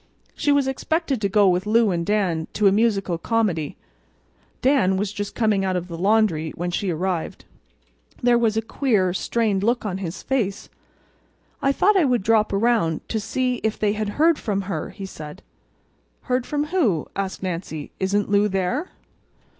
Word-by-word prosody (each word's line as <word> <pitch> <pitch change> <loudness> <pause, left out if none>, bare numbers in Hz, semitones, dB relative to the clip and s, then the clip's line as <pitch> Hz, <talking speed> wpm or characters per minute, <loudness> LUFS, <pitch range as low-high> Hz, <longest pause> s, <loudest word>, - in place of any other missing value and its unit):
She 290 - +1
was 285 -2 +3
expected 275 -1 -1
to 200 - +1
go 205 0 +4
with 180 +2 +1
Lou 225 -1 +4
and 170 -1 -1
Dan 180 -5 0
to 210 - 0
a 195 - +7
musical 195 -5 +1
comedy. 185 -9 -1 0.9
Dan 250 -9 +3
was 200 +1 -2
just 205 0 -5
coming 215 -4 +2
out 190 -1 0
of 180 0 -3
the 170 - -7
laundry 190 -4 +2
when 175 +1 -3
she 190 +2 -1
arrived. 175 0 -3 0.7
There 240 -1 +3
was 220 -2 +1
a 225 - 0
queer, 210 -7 +1
strained 210 0 0
look 235 +2 0
on 190 -2 -3
his 180 -1 -6
face. 225 -8 -2 0.9
"I 275 - +3
thought 400 +8 +3
I 350 - +4
would 245 -6 +1
drop 220 0 +3
around 200 -6 +1
to 220 - -1
see 250 +4 -1
if 220 -1 -2
they 210 -1 +1
had 215 -1 -2
heard 320 +1 +4
from 200 -2 -1
her," 195 +1 -4
he 195 - -8
said. 155 -1 -9 0.8
"Heard 250 -1 -1
from 295 0 0
who?" 220 - +2
asked 195 -1 -4
Nancy. 170 -4 -4
"Isn't 200 +2 0
Lou 205 +1 +3
there?" 200 - -1
205 Hz, 175 wpm, -23 LUFS, 185-235 Hz, 0.9 s, a